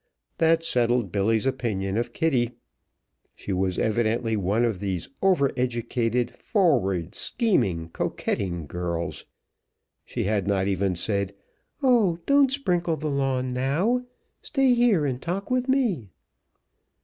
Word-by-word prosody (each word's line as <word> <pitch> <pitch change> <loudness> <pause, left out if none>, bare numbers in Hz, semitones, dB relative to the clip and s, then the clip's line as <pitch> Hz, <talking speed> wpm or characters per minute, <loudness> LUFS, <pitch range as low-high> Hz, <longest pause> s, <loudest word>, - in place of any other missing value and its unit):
That 165 0 +3
settled 120 - +1
Billy's 105 +3 +1
opinion 100 -7 -1
of 120 +1 -1
Kitty! 125 -5 +1 0.8
She 100 - -5
was 95 0 0
evidently 115 +1 +1
one 105 +4 +1
of 110 -6 -1
these 95 -3 -3
over 180 -9 +3
educated, 120 -1 -1
forward, 100 - +1
scheming, 95 - 0
coquetting 85 0 -2
girls. 85 +2 -4 0.8
She - - -4
had 100 -1 0
not 100 -1 +1
even 95 -1 0
said, 100 +2 -1 0.5
"Oh! 230 -10 +4
don't 280 -1 +4
sprinkle 175 - 0
the 155 0 -3
lawn 135 -2 0
now; 150 - +1 0.4
stay 270 -3 +2
here 235 -10 +3
and 130 -2 -2
talk 190 +6 -4
with 255 +1 0
me." 220 - +1
120 Hz, 125 wpm, -25 LUFS, -, 0.8 s, Oh